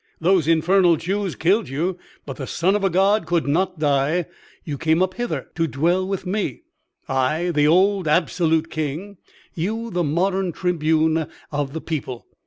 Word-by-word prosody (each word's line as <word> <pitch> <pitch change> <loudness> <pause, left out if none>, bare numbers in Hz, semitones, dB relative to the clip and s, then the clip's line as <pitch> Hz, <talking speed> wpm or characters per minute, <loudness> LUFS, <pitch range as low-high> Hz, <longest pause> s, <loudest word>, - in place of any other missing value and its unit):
Those 175 -2 +2
infernal 170 +2 +4
Jews 190 +2 -2
killed 190 - +1
you, 170 +7 -2 0.3
but 135 - -7
the 135 - -5
son 185 +5 +1
of 210 - -1
a 195 - +3
God 195 +4 +2
could 170 -2 +1
not 180 +5 0
die; 150 +3 +1 0.4
you 150 - -4
came 160 +4 +2
up 185 0 -1
hither 240 +2 -4
to 165 0 0
dwell 175 +6 +1
with 195 -1 -3
me; 205 - -3 0.4
I 155 +7 0
the 150 -2 +3
old 190 +2 +3
absolute 160 0 +1
king, 155 +6 -4 0.4
you 220 +7 -3
the 175 -1 0
modern 185 +4 0
tribune 160 -2 +1 0.2
of 145 -2 -2
the 160 - -4
people. 130 -6 -5
170 Hz, 165 wpm, -22 LUFS, 155-190 Hz, 0.4 s, infernal